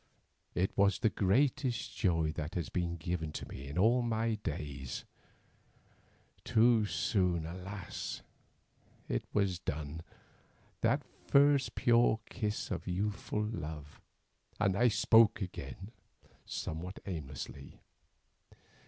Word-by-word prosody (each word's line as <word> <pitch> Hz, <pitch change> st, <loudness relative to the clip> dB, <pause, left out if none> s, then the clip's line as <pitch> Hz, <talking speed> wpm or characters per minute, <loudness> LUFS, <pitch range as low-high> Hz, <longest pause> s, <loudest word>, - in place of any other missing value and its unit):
It 95 Hz, +2 st, 0 dB
was 100 Hz, 0 st, +4 dB
the 110 Hz, -, +2 dB
greatest 125 Hz, +5 st, +1 dB
joy 80 Hz, -5 st, +2 dB
that 75 Hz, 0 st, -5 dB
has 85 Hz, -3 st, -2 dB
been 85 Hz, -1 st, -1 dB
given 80 Hz, -1 st, -3 dB
to -, -, -5 dB
me 70 Hz, +1 st, -8 dB
in 70 Hz, -, -6 dB
all 115 Hz, +6 st, +5 dB
my 115 Hz, -1 st, 0 dB
days. 70 Hz, -5 st, -4 dB, 1.4 s
Too 115 Hz, -1 st, +4 dB
soon, 90 Hz, 0 st, +1 dB
alas! 90 Hz, +3 st, -6 dB, 0.8 s
it -, -, -1 dB
was 95 Hz, -4 st, +1 dB
done, 80 Hz, -1 st, -4 dB, 0.8 s
that -, -, +2 dB, 0.2 s
first 140 Hz, -1 st, +4 dB
pure 120 Hz, -2 st, +4 dB
kiss 105 Hz, -2 st, -2 dB
of -, -, -3 dB
youthful 105 Hz, +3 st, -1 dB
love—and 80 Hz, +2 st, -5 dB
I 120 Hz, +5 st, +4 dB
spoke 110 Hz, 0 st, +5 dB
again 90 Hz, -, -6 dB, 0.6 s
somewhat 90 Hz, +5 st, -4 dB
aimlessly. 75 Hz, -5 st, -6 dB
95 Hz, 105 wpm, -33 LUFS, 80-110 Hz, 1.4 s, all